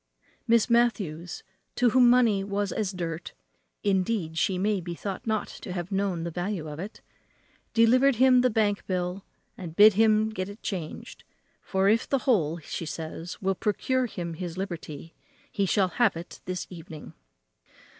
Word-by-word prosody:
Miss 230 -1 +4
Matthews, 200 -9 0 0.3
to 245 -2 +3
whom 250 0 +6
money 235 -5 +4
was 200 0 -2
as 210 -3 -1
dirt 170 -2 -5 0.5
(indeed 190 -4 0
she 185 +3 +1
may 200 +1 0
be 170 0 -6
thought 195 +4 -6
not 220 -1 0
to 180 - -8
have 175 +1 -5
known 195 -4 -1
the 170 - -4
value 175 -1 -3
of 150 0 -7
it), 200 +5 -7 0.7
delivered 250 +4 +5
him 255 +1 +5
the 255 - +3
bank 210 -2 +1
bill, 180 +1 -2 0.4
and 170 -4 -7
bid 210 +2 +8
him 215 +1 +3
get 185 -2 -4
it 205 +2 -12
changed; 175 -6 -6 0.4
for 190 0 0
if 220 +3 +2
the 275 - +3
whole, 170 - +2
says 165 +2 -5
she, - - -7
will 195 - +3
procure 245 +6 0
him 175 -6 -5
his 170 +1 -6
liberty, 165 -4 -6 0.4
he 200 -1 0
shall 190 -1 +2
have 210 -1 +2
it 170 +2 -9
this 185 -1 -3
evening. 165 -3 -10
195 Hz, 165 wpm, -27 LUFS, 175-220 Hz, 0.7 s, bid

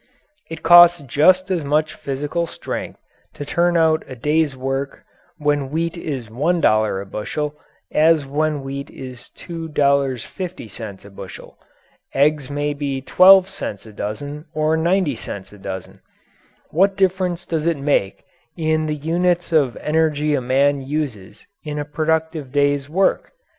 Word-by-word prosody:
It 165 0 -8
costs 175 +1 +8
just 185 +8 +3
as 175 -4 0
much 150 +2 +1
physical 145 +5 -3
strength - - -6 0.4
to 145 - -6
turn 170 +3 +2
out 160 -1 +3
a 130 - -8
day's 150 +2 0
work 135 +1 -3 0.3
when 145 -2 0
wheat 165 +3 -2
is 140 -8 -5
$1 110 - +1
a - - -8
bushel, 145 +9 -4 0.4
as 155 -1 +4
when 150 +1 -1
wheat 140 +1 -6
is 125 -2 -10
$2.50 140 - -2
a - - -11
bushel. 95 -1 -10 0.6
Eggs 145 0 +2
may 145 +1 -1
be 140 -2 -3
12 185 +7 +7
cents 190 - -6
a 110 - -12
dozen 145 +10 -5
or 155 +1 +2
90 170 -2 +1
cents 100 -3 -8
a 105 - -14
dozen. 95 -1 -7 0.7
What 195 +4 +2
difference 185 -2 0
does 160 -1 -2
it 165 -2 +1
make 140 -9 0 0.3
in 155 -1 0
the 150 - -1
units 175 +4 0
of 145 -7 +2
energy 150 -1 +1
a 140 - +1
man 135 +3 +2
uses 130 -9 -5 0.2
in 150 -1 -5
a 145 - -3
productive 155 -1 -1
day's 145 0 +1
work? 190 +5 +1
150 Hz, 140 wpm, -20 LUFS, 135-165 Hz, 0.7 s, costs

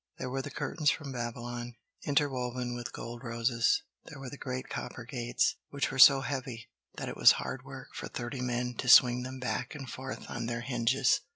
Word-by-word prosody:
There 125 - -4
were 135 +1 -1
the 145 - -6
curtains 150 +2 0
from 145 -3 -2
Babylon, 120 0 -5 0.3
interwoven 125 -4 0
with 120 0 -5
gold 120 +1 -7
roses; 115 0 +1 0.2
there 155 - -10
were 135 -2 -7
the - - -6
great 130 -1 -4
copper 120 - -6
gates, 120 -1 0
which 140 -1 -1
were 135 - -4
so 140 0 +9
heavy 130 -3 -5 0.3
that - - -4
it - - -5
was - - +8
hard - - -5
work - - -10
for - - -5
thirty 120 +2 -5
men 125 0 -1
to 125 - -1
swing 125 0 +8
them 130 +1 -6
back 125 0 -3
and 135 -3 -7
forth 130 +1 -7
on 115 - -4
their 120 0 -2
hinges. 125 +1 +2
125 Hz, 195 wpm, -31 LUFS, 120-135 Hz, 0.3 s, so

